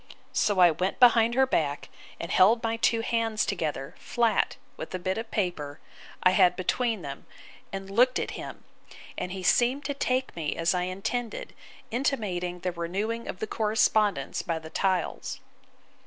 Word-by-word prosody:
So 205 -2 +2
I 175 -2 +7
went 180 +5 -2
behind 235 -1 +6
her 265 +1 +5
back, 145 - -1 0.3
and 170 - -5
held 225 +5 +5
my 225 0 0
two 230 0 +2
hands 225 -2 0
together, 155 -7 -3
flat, 230 -3 +1 0.2
with - - -6
a - - 0
bit 185 +3 -2
of 225 - -6
paper, 155 -8 -2 0.4
I 185 - +6
had, 185 -2 +5
between 215 +2 -1
them, 140 -1 -7 0.4
and 195 0 -5
looked 245 +6 +3
at - - -2
him: - - -8 0.5
and 180 - -4
he 190 0 -5
seemed 250 +8 +3
to 285 - -1
take 260 -1 -1
me 160 -3 -2
as 165 +2 +1
I 180 0 0
intended; 205 +5 -4 0.4
intimating 195 -9 -1
the 180 - -1
renewing 195 +7 -3
of - - -5
the 220 - -3
correspondence 210 -7 +1
by 165 -2 -2
the 160 0 -9
tiles. 185 -3 -1
195 Hz, 165 wpm, -27 LUFS, 175-230 Hz, 0.5 s, I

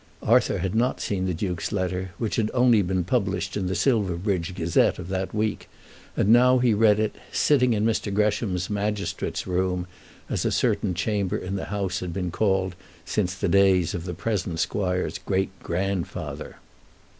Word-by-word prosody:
Arthur - - +3
had 95 +1 -2
not 120 +3 +1
seen 95 -2 -1
the 90 - 0
Duke's 90 -2 -3
letter, 95 -2 -2
which 115 - -2
had 110 -2 +1
only 120 -3 +5
been 95 -1 0
published 100 0 -1
in 95 -3 -1
the 95 - -1
"Silverbridge 95 -6 0
Gazette" 85 -2 +2
of 90 0 -7
that 95 0 -2
week, 110 0 -2 0.5
and - - +2
he - - +8
now 125 +1 +6
read 110 -4 +4
it, 110 -1 0 0.2
sitting 125 -5 +3
in 105 0 +1
Mr. 110 -2 0
Gresham's 100 -3 0
magistrate's 105 0 -2
room, 90 0 -1 0.4
as - - -1
a - - +1
certain 90 - +1
chamber 100 0 -1
in 95 +2 -4
the 95 - -3
house 100 -2 -2
had 90 -2 -5
been 90 -1 -2
called 95 -2 0 0.3
since 95 -3 -1
the 100 +1 -1
days 95 -2 +4
of 85 -1 -4
the 90 -2 -4
present 90 -4 -2
squire's 90 -2 -1
great 95 0 -1
grandfather. 95 0 -3
95 Hz, 170 wpm, -25 LUFS, 90-105 Hz, 0.5 s, he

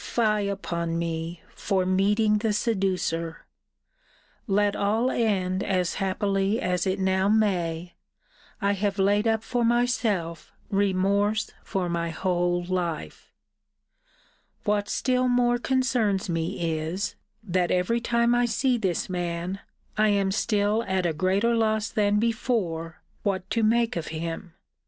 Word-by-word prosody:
Fie 215 -3 +1
upon 170 -4 -2
me! 165 0 -3
for 190 -3 0
meeting 210 +3 +2
the 215 -1 0
seducer! 185 -6 -1 1.0
Let 205 0 +2
all 220 +5 +1
end 190 -5 0
as 180 -3 0
happily 195 +2 0
as 180 +1 0
it 190 +1 0
now 190 +1 +2
may, 180 -5 0 0.7
I 200 0 +1
have 200 0 -1
laid 205 +3 +2
up 220 0 +1
for 245 +1 -1
myself 230 -8 0 0.2
remorse 200 +2 +1
for 185 -2 -2
my 170 -1 -1
whole 175 +1 0
life. 175 - -4 1.3
What 205 0 0
still 255 0 +1
more 245 -1 +2
concerns 235 -7 +1
me 165 -1 -1
is, 185 +6 -3 0.3
that 180 -3 0
every 185 +6 +1
time 235 0 +2
I 245 0 +3
see 240 +2 +1
this 185 -5 -1
man, 175 +1 -3 0.4
I 215 - +5
am 200 -2 +2
still 210 +1 +1
at 190 -1 0
a 170 - +1
greater 190 +8 +1
loss 220 -1 +1
than 205 -1 +2
before 210 -8 -1 0.2
what 190 -2 -1
to 230 +1 +1
make 230 +1 +2
of 170 - -3
him. 165 +2 -5
195 Hz, 130 wpm, -26 LUFS, 180-220 Hz, 1.3 s, I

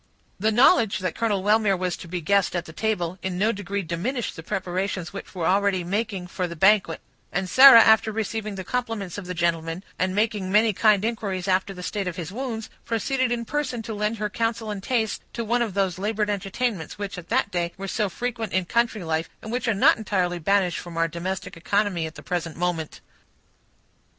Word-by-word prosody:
The 215 +3 +2
knowledge 230 -2 +5
that 185 -1 -2
Colonel 205 -4 0
Wellmere 210 -1 +3
was 180 -1 -1
to 175 - -10
be 180 +2 -3
a - - -4
guest 200 +3 +2
at 175 0 -2
the 160 - -11
table 185 -4 -2
in 185 -1 -3
no 210 +4 +2
degree 200 -1 -3
diminished 205 - -3
the - - -8
preparations 185 0 -3
which 200 - -9
were 175 -3 -2
already 195 -1 +2
making 200 0 -2
for 180 0 -3
the 170 - -7
banquet; 190 -1 +3 0.3
and 190 0 -1
Sarah, 260 +1 +10
after 220 0 +5
receiving 215 -1 -3
the 190 - -5
compliments 225 -5 -3
of 185 - -9
the 180 - -4
gentleman, 165 +1 -1 0.2
and 185 +1 0
making 210 -3 0
many 215 +1 +4
kind 210 +1 +3
inquiries 200 -5 -2
after 190 +1 +1
the 180 -2 -8
state 200 0 -3
of 180 - -3
his 175 -2 -5
wounds, 230 -1 -4 0.2
proceeded 255 +2 0
in 235 -1 -1
person 260 -4 -2
to 220 - -5
lend 210 +2 -1
her 210 0 -1
counsel 225 +1 -2
and 200 -2 -5
taste 220 -1 -1
to 235 - -3
one 240 +2 +1
of 220 -5 -2
those 190 -3 0
labored 210 +1 0
entertainments, 200 -3 -3
which, 200 -1 -5
at 175 - -13
that 200 - +1
day, 175 -2 -1
were 195 +1 -5
so 210 +1 0
frequent 230 +1 -4
in 185 -1 +1
country 235 -1 0
life, 160 0 -1
and 220 - -6
which 250 +1 -2
are 225 - +2
not 195 - +5
entirely 185 -5 -1
banished 185 0 +1
from 175 -1 -9
our 165 0 +2
domestic 180 +4 -5
economy 185 -1 0
at 160 - -11
the 145 - -11
present 170 -3 -3
moment. 170 -3 -2
200 Hz, 210 wpm, -24 LUFS, 180-220 Hz, 0.3 s, Sarah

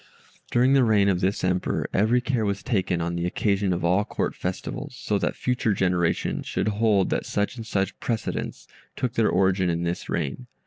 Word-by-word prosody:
During 125 +3 +3
the 135 -2 +5
reign 105 -3 +4
of 90 -3 +1
this 95 +2 0
Emperor 90 0 0
every 110 +5 +3
care 125 -3 0
was 100 -1 -1
taken 95 -7 0
on 85 +1 -2
the 85 0 -1
occasion 100 +1 0
of 85 -1 -1
all 90 +4 +3
Court - - -2
Festivals, - - -5
so - - -1
that - - -1
future 120 -4 0
generations 90 -2 0
should 105 - 0
hold 105 -2 +2
that - - 0
such 105 +4 -1
and 115 -2 -8
such 100 -2 -1
precedents 115 -3 -3 0.3
took 125 -2 -2
their 115 -3 +2
origin 95 -1 +2
in 85 0 -1
this 85 +1 -3
reign. 85 - -3
100 Hz, 190 wpm, -25 LUFS, 90-115 Hz, 0.3 s, the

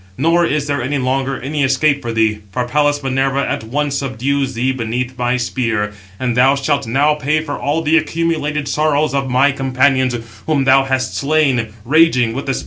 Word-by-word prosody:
Nor 165 +5 +2
is 150 0 -1
there 145 -2 -1
any 140 +4 -1
longer 135 +1 -1
any 145 +2 -2
escape 140 +2 +2
for 120 -3 -4
thee, 110 -2 +1
for 125 +2 -2
Pallas 145 +2 +1
Minerva 135 +1 0
at - - -3
once 140 +4 -2
subdues 135 0 -2
thee 125 +3 0
beneath 125 +1 -3
my 125 0 0
spear, 115 -4 -1 0.3
and 125 -2 -1
thou 130 +3 +4
shalt 140 -1 -1
now 140 +6 +2
pay 150 +1 0
for 155 -2 -5
all 150 +3 -1
the 160 +1 +3
accumulated 155 -2 -2
sorrows 150 0 +1
of 135 -1 -1
my 130 +3 +3
companions, 130 -1 +1 0.3
whom 150 -4 +1
thou 135 0 +4
hast 130 -1 -1
slain, 140 -5 +1 0.2
raging 130 -5 +3
with 140 - -5
the 135 - 0
spear." - - -3
135 Hz, 190 wpm, -17 LUFS, 125-145 Hz, 0.3 s, thou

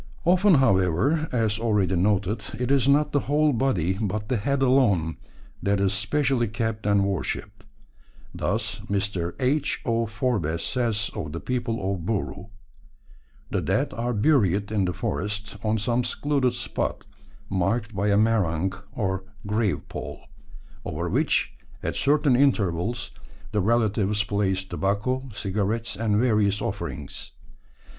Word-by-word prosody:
Often, 185 +2 +5
however, 130 - +2
as 110 -3 +1
already 105 -5 +1
noted, 100 +3 +1 0.2
it 125 +1 0
is 140 -1 +3
not 150 +1 +3
the 145 - +2
whole 150 0 +3
body, 95 -8 0
but 105 0 -2
the 125 - +1
head 135 +6 0
alone, 110 -12 +3 0.4
that 100 0 +1
is 100 0 +2
specially 125 +4 +1
kept 110 0 -3
and 100 -1 +4
worshipped. 100 -3 -3 0.7
Thus 105 +2 -1
Mr. 100 -4 -1
H. 140 +3 +1
O. 115 -1 +1
Forbes 105 -8 -1
says 115 -5 0
of 75 0 -5
the 85 - -4
people 115 -5 -2
of 90 -4 -5
Buru: 95 -1 -3 1.0
"The - - 0
dead - - 0
are 120 +1 -2
buried 105 - +2
in 100 -3 +1
the 90 - -1
forest 105 +5 -3
on 110 0 +1
some 120 +3 +1
secluded 140 -1 0
spot, - - -3 0.4
marked 105 +4 -1
by 100 +1 0
a 100 -1 +3
merang, 95 -5 +2 0.2
or 95 -3 -2 0.2
grave 105 -1 0
pole, - - -7 0.6
over - - -3
which - - +1 0.3
at - - -2
certain 145 -2 +3
intervals 115 -5 +1 0.4
the 105 -2 +1
relatives 105 -1 +2
place 95 -2 0
tobacco, 105 +8 -1
cigarettes, 105 +2 -2
and 105 0 +1
various 105 -4 +2
offerings. - - -5
105 Hz, 135 wpm, -25 LUFS, 100-125 Hz, 1.0 s, Often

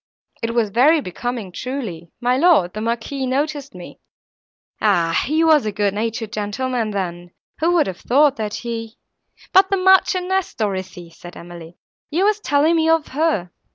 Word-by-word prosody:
It 230 0 -3
was 225 -4 +1
very 290 +9 +4
becoming 235 - -5
truly;—my 245 -1 -4
lord, 290 - +4
the 215 - -5
Marquis, 235 +4 -3
noticed 285 -1 -2
me. 175 -1 -11 0.8
Ah! 170 -6 +2
he 310 +3 +2
was 310 -7 +4
a - - -1
good 205 -1 0
natured 225 +1 -3
gentleman 225 +2 -2
then—who 185 - -4
would 345 -4 +3
have 185 -2 -6
thought 285 +3 +3
that 210 -2 -3
he—" 230 -1 -6 0.6
"But 380 0 +6
the 390 - +1
Marchioness, 380 0 +2
Dorothée," 185 -5 -4
said 175 +1 -12
Emily, 170 0 -11 0.3
"you 350 +6 +1
were 425 - +4
telling 300 +4 +2
me 320 0 +2
of 325 -2 +2
her." 270 - -1
235 Hz, 155 wpm, -20 LUFS, 195-305 Hz, 0.8 s, But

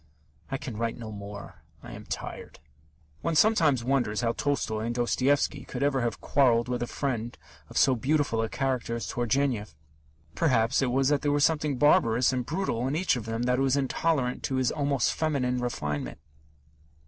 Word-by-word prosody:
I 135 - -2
can 130 -6 -7
write 115 0 -2
no 115 -2 -7
more; 100 0 -9 0.2
I - - -9
am - - -10
tired. - - -6 0.6
One 165 - -1
sometimes 155 - +4
wonders 120 -5 0
how 115 -1 +1
Tolstoy 115 -4 -1
and 120 0 -2
Dostoevsky 135 +3 +1
could 130 +1 -4
ever 140 -2 +1
have 115 -4 -2
quarrelled 120 -4 +3
with 125 -1 -2
a 120 - -1
friend 120 -4 -3 0.3
of - - -6
so 135 - +5
beautiful 130 -1 +1
a 115 - -2
character 130 -3 -1
as 115 - -4
Turgenev. 120 - -1 0.6
Perhaps 125 -5 +2
it 130 - +1
was 135 +2 +2
that 145 -1 +2
there 145 - +1
was 145 0 +4
something 150 -4 0
barbarous 125 -4 +4
and 125 -2 -2
brutal 150 -8 -1
in 135 - -1
each 175 -2 +2
of 120 -4 -5
them 115 +1 -2
that 125 +1 +1
was 135 0 +2
intolerant 135 -1 0
of 130 - -1
his 130 -2 +1
almost 140 -4 0
feminine 135 -6 0
refinement. 75 -12 -3
125 Hz, 180 wpm, -27 LUFS, 115-140 Hz, 0.6 s, so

